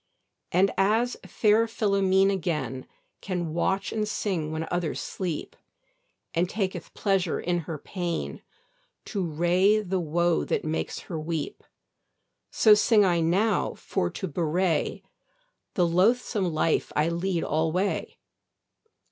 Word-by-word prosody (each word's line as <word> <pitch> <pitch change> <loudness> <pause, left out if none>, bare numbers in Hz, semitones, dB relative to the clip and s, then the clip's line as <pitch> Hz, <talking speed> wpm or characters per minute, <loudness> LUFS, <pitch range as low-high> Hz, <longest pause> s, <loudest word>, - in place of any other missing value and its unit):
And 190 +3 +3
as 225 +5 +2
fair 220 +1 +3
Philomene 195 -3 +2
again 150 -9 -2 0.3
Can 175 -5 -3
watch 190 +3 0
and 215 -1 -1
sing 180 -8 -2
when 160 +1 -3
others 175 -3 -1
sleep; 175 -5 -4 0.8
And 175 +1 +1
taketh 195 -2 -3
pleasure 195 -4 +1
in 175 0 0
her 160 - -3
pain, 175 +2 -4 0.6
To 200 -4 -2
wray 175 +6 +3
the 190 -2 -1
woe 170 +1 +1
that - - -1
makes 155 +1 -3
her 165 -4 -5
weep; 155 -1 -4 0.9
So 215 - +6
sing 210 0 +5
I 175 -2 +2
now 185 +6 +1
for 85 - -2
to 190 - -5
bewray 165 +1 0 0.7
The 180 - +3
loathsome 190 +2 +2
life 155 +1 +1
I 150 +2 +2
lead 170 +1 -1
alway. 160 +6 -1
180 Hz, 120 wpm, -26 LUFS, 165-195 Hz, 0.9 s, So